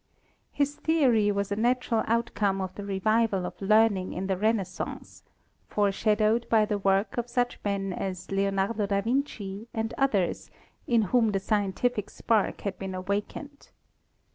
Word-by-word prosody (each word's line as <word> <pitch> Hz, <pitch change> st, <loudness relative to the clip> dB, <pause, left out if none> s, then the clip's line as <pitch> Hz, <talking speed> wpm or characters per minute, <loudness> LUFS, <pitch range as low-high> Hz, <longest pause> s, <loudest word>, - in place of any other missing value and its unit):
His 290 Hz, 0 st, -1 dB
theory 250 Hz, -10 st, +3 dB
was 200 Hz, 0 st, -2 dB
a -, -, +1 dB
natural 240 Hz, 0 st, +1 dB
outcome 215 Hz, -4 st, 0 dB
of 185 Hz, -1 st, -4 dB
the 205 Hz, -, -7 dB
revival 200 Hz, 0 st, +1 dB
of -, -, -8 dB
learn 215 Hz, +1 st, +4 dB
ing 185 Hz, 0 st, -5 dB
in 185 Hz, -, -3 dB
the 190 Hz, 0 st, 0 dB
Renaissance, 195 Hz, -2 st, -2 dB, 0.5 s
foreshadowed 215 Hz, +3 st, +1 dB
by 220 Hz, -2 st, +4 dB
the 210 Hz, -1 st, -2 dB
work 195 Hz, +3 st, +1 dB
of 240 Hz, 0 st, -4 dB
such 245 Hz, 0 st, -1 dB
men 195 Hz, -2 st, -1 dB
as 185 Hz, 0 st, -5 dB
Leonardo 195 Hz, +2 st, 0 dB
da 200 Hz, 0 st, +1 dB
Vinci 225 Hz, -4 st, -2 dB
and 225 Hz, 0 st, -2 dB
others, 210 Hz, -10 st, 0 dB, 0.4 s
in 235 Hz, -2 st, +3 dB
whom 235 Hz, -3 st, +4 dB
the 195 Hz, -, +1 dB
scien 205 Hz, 0 st, 0 dB
tific 220 Hz, -1 st, -1 dB
spark 220 Hz, -3 st, 0 dB
had 195 Hz, -2 st, -4 dB
been 190 Hz, -1 st, -5 dB
awakened. 205 Hz, -, -4 dB
210 Hz, 155 wpm, -27 LUFS, 195-230 Hz, 0.5 s, learn